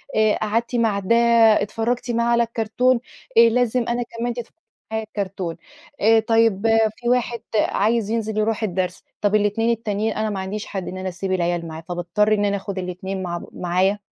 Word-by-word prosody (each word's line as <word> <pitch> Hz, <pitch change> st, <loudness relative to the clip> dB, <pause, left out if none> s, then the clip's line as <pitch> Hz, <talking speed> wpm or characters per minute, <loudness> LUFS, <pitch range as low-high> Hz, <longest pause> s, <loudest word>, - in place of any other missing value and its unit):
آآ 215 Hz, -1 st, +3 dB
قعدتِ 230 Hz, +3 st, -1 dB
مع 225 Hz, -4 st, +2 dB
ده 200 Hz, +4 st, +2 dB, 0.5 s
اتفرجتِ 235 Hz, +4 st, -2 dB
معاه 235 Hz, 0 st, +1 dB
على 235 Hz, 0 st, +4 dB
الكرتون، 235 Hz, +2 st, +1 dB, 0.4 s
آآ -, -, +10 dB
لازم 245 Hz, 0 st, +1 dB
أنا 240 Hz, 0 st, 0 dB
كمان 235 Hz, +1 st, -4 dB
تتفرجي 240 Hz, +3 st, -8 dB, 0.4 s
معايا 220 Hz, 0 st, -1 dB
على -, -, -42 dB
الكرتون. 190 Hz, -5 st, -4 dB, 0.4 s
آآ 225 Hz, +2 st, +5 dB
طيب 225 Hz, -2 st, +2 dB, 0.3 s
في 240 Hz, -1 st, -2 dB
واحد 240 Hz, -1 st, 0 dB, 0.2 s
عايز 215 Hz, +1 st, +1 dB
ينزل 220 Hz, -1 st, -2 dB
يرُوح 220 Hz, +1 st, 0 dB
الدرس، 180 Hz, -2 st, -2 dB, 0.2 s
طب 205 Hz, 0 st, +2 dB
ال2 210 Hz, +2 st, +1 dB
التانيين 220 Hz, -1 st, -1 dB
أنا 215 Hz, 0 st, -1 dB
ما 195 Hz, -2 st, -3 dB
عنديش 200 Hz, +2 st, -4 dB
حد 195 Hz, -3 st, -5 dB
إن 185 Hz, -, -5 dB
أنا 185 Hz, 0 st, -3 dB
أسيب 185 Hz, +2 st, -4 dB
العيال 175 Hz, -2 st, 0 dB
معاه، 160 Hz, 0 st, -7 dB
فباضطر 175 Hz, +5 st, +1 dB
إن 205 Hz, -1 st, +2 dB
أنا 200 Hz, 0 st, +1 dB
أخد 195 Hz, 0 st, -6 dB
الاتنين 185 Hz, +1 st, -4 dB
مع 175 Hz, -1 st, -3 dB
ب -, -, -9 dB
معايا. 185 Hz, +3 st, 0 dB
215 Hz, 185 wpm, -22 LUFS, 190-230 Hz, 0.5 s, آآ